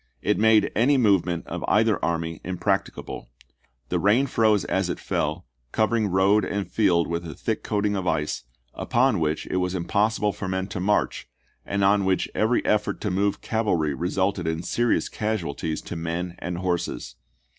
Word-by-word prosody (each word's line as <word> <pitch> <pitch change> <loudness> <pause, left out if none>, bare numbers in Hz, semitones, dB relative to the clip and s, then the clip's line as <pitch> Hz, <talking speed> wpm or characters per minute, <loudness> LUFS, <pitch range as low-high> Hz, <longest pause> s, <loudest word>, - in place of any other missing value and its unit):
It - - +1
made 110 0 +4
any 135 +5 +4
movement 95 -7 +2
of - - -5
either - - +2
army 85 -1 -2
impracticable. 90 -1 -2 0.6
The - - 0
rain 110 +7 +3
froze 110 -6 +2
as - - 0
it - - -3
fell, - - -2 0.3
covering 110 0 +1
road 95 +3 +3
and 100 0 -2
field 90 -4 +2
with 85 0 -2
a 80 - -7
thick - - -3
coating 105 0 0
of 95 -2 -2
ice, 75 -6 -1 0.3
upon 120 -4 +1
which 80 -1 -1
it - - 0
was 90 0 -1
impossible 105 +3 +1
for 100 - -5
men 95 0 -1
to 95 - -4
march, 105 -6 0 0.4
and 100 0 0
on 100 +1 +4
which 95 -1 +1
every 110 +3 +1
effort 105 0 +1
to 105 - -1
move 100 +2 0
cavalry 90 -10 0
resulted 90 +3 -1
in 80 +1 -2
serious 120 +4 +1
casualties 85 -7 -3
to - - -6
men 85 +2 -3
and 90 0 -4
horses. 90 -8 -2
95 Hz, 165 wpm, -25 LUFS, 85-105 Hz, 0.6 s, made